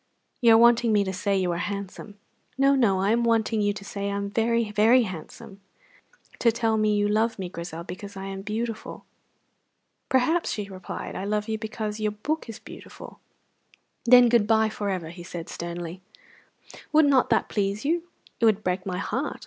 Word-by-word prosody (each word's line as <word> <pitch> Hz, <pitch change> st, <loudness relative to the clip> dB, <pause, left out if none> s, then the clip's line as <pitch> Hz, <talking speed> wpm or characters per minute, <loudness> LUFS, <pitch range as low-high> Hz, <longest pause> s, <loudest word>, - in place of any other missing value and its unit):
"You 230 Hz, -2 st, +7 dB
are -, -, +7 dB
wanting 235 Hz, 0 st, +5 dB
me 205 Hz, -1 st, +3 dB
to 190 Hz, -1 st, -3 dB
say 200 Hz, +1 st, 0 dB
you 185 Hz, -2 st, 0 dB
are 170 Hz, -, -2 dB
handsome." 200 Hz, +2 st, -6 dB, 0.4 s
"No, 275 Hz, +1 st, +4 dB
no; 225 Hz, -8 st, +3 dB
I 195 Hz, +2 st, +2 dB
am 235 Hz, +1 st, +2 dB
wanting 225 Hz, -1 st, +1 dB
you 205 Hz, 0 st, +2 dB
to 200 Hz, -1 st, -9 dB
say 200 Hz, 0 st, -4 dB
I 200 Hz, -, -2 dB
am 200 Hz, 0 st, -3 dB
very, 230 Hz, 0 st, +1 dB
very 225 Hz, +5 st, +5 dB
handsome. 190 Hz, +1 st, -9 dB, 0.8 s
Tell 230 Hz, -1 st, +2 dB
me 215 Hz, -1 st, +2 dB
you 205 Hz, 0 st, +2 dB
love 220 Hz, +2 st, +1 dB
me, 185 Hz, -3 st, -5 dB
Grizel, 170 Hz, -1 st, -7 dB
because 195 Hz, +3 st, -9 dB
I 195 Hz, -, -6 dB
am 195 Hz, 0 st, -6 dB
beautiful." 220 Hz, +2 st, -5 dB, 1.0 s
"Perhaps," 320 Hz, +7 st, +2 dB
she 210 Hz, -2 st, -4 dB
replied, 185 Hz, -2 st, -7 dB
"I 190 Hz, -, -4 dB
love 210 Hz, +1 st, -1 dB
you 220 Hz, -1 st, -2 dB
because 215 Hz, -1 st, -4 dB
your 210 Hz, -1 st, -1 dB
book 295 Hz, +6 st, -3 dB
is 225 Hz, -, -7 dB
beautiful." -, -, -12 dB, 0.9 s
"Then 245 Hz, 0 st, +8 dB
good 230 Hz, -3 st, +3 dB
bye 220 Hz, 0 st, +3 dB
for 205 Hz, -1 st, -4 dB
ever," 180 Hz, -4 st, -3 dB
he 175 Hz, +1 st, -10 dB
said 175 Hz, -1 st, -7 dB
sternly. 170 Hz, +1 st, -6 dB, 0.9 s
"Would 310 Hz, 0 st, +5 dB
not 275 Hz, -3 st, +3 dB
that -, -, +2 dB
please 200 Hz, +2 st, -2 dB
you?" 335 Hz, +3 st, 0 dB, 0.3 s
"It 230 Hz, -, +3 dB
would 215 Hz, -1 st, +3 dB
break 185 Hz, +1 st, -2 dB
my 180 Hz, -1 st, -2 dB
heart." 255 Hz, +8 st, -3 dB
210 Hz, 190 wpm, -25 LUFS, 195-230 Hz, 1.0 s, Then